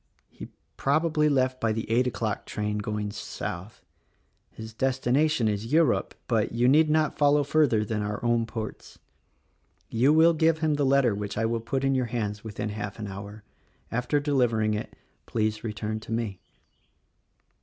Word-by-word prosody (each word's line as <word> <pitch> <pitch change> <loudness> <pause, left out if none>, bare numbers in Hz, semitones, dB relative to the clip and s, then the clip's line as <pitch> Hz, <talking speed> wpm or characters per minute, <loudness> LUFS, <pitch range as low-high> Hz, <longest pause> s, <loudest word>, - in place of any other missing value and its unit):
He, - - -10 0.3
probably 150 +2 +2
left 130 -2 +1
by 115 - +2
the 110 0 -4
eight 120 +3 +2
o'clock 110 -4 -3
train 105 0 -2
going 105 -1 -3
south. 100 -1 -6 0.7
His 110 0 -10
destination 130 +2 +1
is 105 +3 -2
Europe, 160 -4 +2
but 110 -3 0
you 120 +1 +2
need 155 +4 +5
not 155 -1 +1
follow 145 0 +4
further 140 -7 +2
than 105 0 -2
our 105 0 -3
own 120 -1 +2
ports. 110 -1 -7 0.9
You 125 +5 +3
will 160 +2 +6
give 160 0 +3
him 155 -1 +1
the 145 -2 +1
letter 135 -4 +4
which 100 0 -5
I 115 - +1
will 115 0 -1
put 130 +4 -2
in 135 0 +2
your 130 -2 0
hands 105 -3 -3
within 105 -1 -4
half 105 -1 -5
an 110 - -5
hour. 100 +2 -8 0.5
After 125 +5 0
deliver 130 -6 +1
ing 110 0 +1
it, 105 +1 -4 0.4
please 110 -1 -1
return 110 -1 -3
to 110 - -11
me." 115 -5 -2
115 Hz, 165 wpm, -27 LUFS, 105-140 Hz, 0.9 s, will